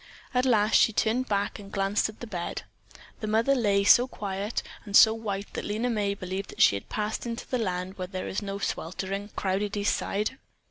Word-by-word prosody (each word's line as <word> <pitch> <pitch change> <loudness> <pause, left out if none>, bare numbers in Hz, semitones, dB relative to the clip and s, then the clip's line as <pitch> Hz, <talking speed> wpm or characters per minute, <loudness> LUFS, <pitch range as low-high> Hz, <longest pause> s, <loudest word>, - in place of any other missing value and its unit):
At 250 +1 +2
last 215 -3 +4
she - - +5
turned 230 +4 +1
back 200 +1 -1
and 200 -1 -11
glanced 195 +2 +1
at 215 - -13
the - - -4
bed. 180 -6 -4 0.6
The 215 - -4
mother 225 +5 +3
lay 205 -6 +2
so 240 +5 +6
quiet 200 -2 -3 0.2
and 205 -2 +3
so 220 - +8
white 205 -3 -4
that - - -4
Lena 225 +4 -1
May 205 -3 0
believed 190 +1 -5
that - - -5
she - - +6
had 100 - -7
passed 215 +3 -2
into 230 0 -5
the 255 - -1
land 185 -2 -3
where 185 - -3
there 185 0 -5
is 190 - -2
no 200 -1 -4
sweltering, 195 +2 -3
crowded 200 +2 -1
East 205 0 +2
Side. 210 +7 -2
205 Hz, 205 wpm, -27 LUFS, 195-225 Hz, 0.6 s, so